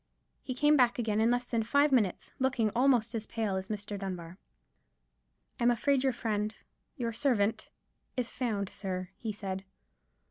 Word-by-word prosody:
He 255 Hz, -, -4 dB
came 295 Hz, +3 st, +5 dB
back 250 Hz, -4 st, +4 dB
again 220 Hz, -3 st, +1 dB
in 225 Hz, -, +4 dB
less 245 Hz, 0 st, +1 dB
than 230 Hz, -2 st, 0 dB
five 285 Hz, +6 st, +3 dB
minutes, 215 Hz, -9 st, +1 dB
looking 255 Hz, -5 st, +2 dB
almost 240 Hz, -2 st, +3 dB
as 225 Hz, -2 st, -3 dB
pale 220 Hz, -4 st, -1 dB
as 190 Hz, 0 st, -3 dB
Mr. 205 Hz, -1 st, -4 dB
Dunbar. 185 Hz, -2 st, -6 dB, 1.2 s
"I'm 235 Hz, -, +4 dB
afraid 260 Hz, +3 st, +2 dB
your 265 Hz, -, +3 dB
friend—your 225 Hz, +2 st, -4 dB
servant—is 235 Hz, 0 st, -2 dB
found, 210 Hz, -6 st, -1 dB
sir," 185 Hz, -2 st, -4 dB
he 225 Hz, -, -3 dB
said. 195 Hz, -2 st, -4 dB
225 Hz, 145 wpm, -31 LUFS, 205-250 Hz, 1.2 s, came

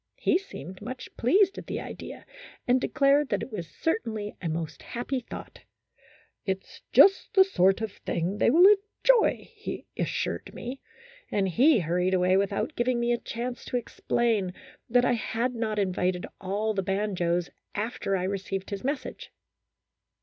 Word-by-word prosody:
He 355 Hz, -, +2 dB
seemed 185 Hz, -, -10 dB
much 250 Hz, +4 st, -7 dB
pleased 385 Hz, -, +3 dB
at -, -, -11 dB
the -, -, -3 dB
idea, -, -, -8 dB, 0.4 s
and 250 Hz, +1 st, +4 dB
declared 280 Hz, 0 st, +3 dB
that -, -, 0 dB
it -, -, -8 dB
was 180 Hz, -6 st, -5 dB
certainly 220 Hz, -8 st, -2 dB
a 170 Hz, -, -2 dB
most 160 Hz, 0 st, -4 dB
"happy 255 Hz, +2 st, -3 dB
thought;" 240 Hz, -, -9 dB, 0.8 s
it's 190 Hz, -1 st, -4 dB
just 390 Hz, 0 st, +6 dB
the 385 Hz, -, +9 dB
sort 195 Hz, -, +3 dB
of 220 Hz, -2 st, -2 dB
thing 185 Hz, +1 st, -3 dB
they -, -, +4 dB
will 335 Hz, +9 st, +7 dB
enjoy, 420 Hz, +4 st, +3 dB
he 425 Hz, -1 st, -6 dB
assured -, -, -2 dB
me; 255 Hz, +3 st, -6 dB, 0.5 s
and 195 Hz, -2 st, +1 dB
he 250 Hz, -, +5 dB
hurried 180 Hz, +3 st, +1 dB
away 185 Hz, 0 st, +3 dB
without 200 Hz, +9 st, 0 dB
giving 240 Hz, 0 st, +1 dB
me 235 Hz, 0 st, +1 dB
a -, -, +1 dB
chance 245 Hz, +1 st, -5 dB
to 250 Hz, -, -1 dB
ex 240 Hz, -, -8 dB
plain 215 Hz, -6 st, +1 dB, 0.3 s
that 245 Hz, +1 st, +4 dB
I 245 Hz, -, +3 dB
had 235 Hz, +2 st, -1 dB
not 225 Hz, -2 st, -2 dB
invited 185 Hz, -2 st, 0 dB
all 205 Hz, +3 st, -1 dB
the 195 Hz, -, 0 dB
banjos 180 Hz, -3 st, -1 dB, 0.2 s
after 210 Hz, -2 st, -1 dB
I 180 Hz, -, -2 dB
received 195 Hz, 0 st, -3 dB
his 200 Hz, -1 st, -4 dB
message. 275 Hz, 0 st, -4 dB
220 Hz, 160 wpm, -27 LUFS, 190-255 Hz, 0.8 s, the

